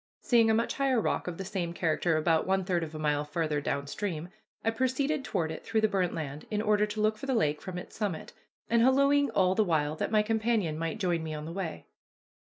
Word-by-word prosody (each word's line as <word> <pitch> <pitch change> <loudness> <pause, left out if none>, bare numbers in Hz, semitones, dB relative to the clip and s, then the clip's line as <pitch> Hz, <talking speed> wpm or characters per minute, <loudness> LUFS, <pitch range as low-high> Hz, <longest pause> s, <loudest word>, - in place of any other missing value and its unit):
Seeing 230 -2 +4
a 220 - +4
much 230 +1 0
higher 270 -3 +2
rock 215 - -1
of 175 -2 -4
the 195 - -5
same 175 -3 -3
character 165 -1 +1
about 160 +1 +2
one 190 0 +2
third 175 -3 0
of 160 -1 -7
a - - -4
mile 150 -1 0
farther 150 -1 -1
down 140 0 -2
stream, 170 +1 -4 0.4
I 225 - +3
proceeded 265 +5 0
toward 160 -9 -1
it 160 - -7
through 225 -1 0
the 220 - +4
burnt 190 -4 0
land, 150 -2 -5
in 210 - -1
order 210 0 +2
to 210 +1 -5
look 215 0 +1
for 275 - -6
the 265 - +1
lake 150 -9 +1
from 185 -2 -6
its 180 - -9
summit, 200 -7 -3 0.3
and 235 0 +3
hallooing 280 +3 +4
all 185 -1 +3
the 215 - +3
while 155 -5 0
that - - -1
my 215 -1 +3
companion 220 -6 0
might 165 +5 -2
join 175 -5 0
me 160 -1 -4
on 150 0 -6
the 165 - -6
way. 180 -4 -5
190 Hz, 240 wpm, -29 LUFS, 160-220 Hz, 0.4 s, Seeing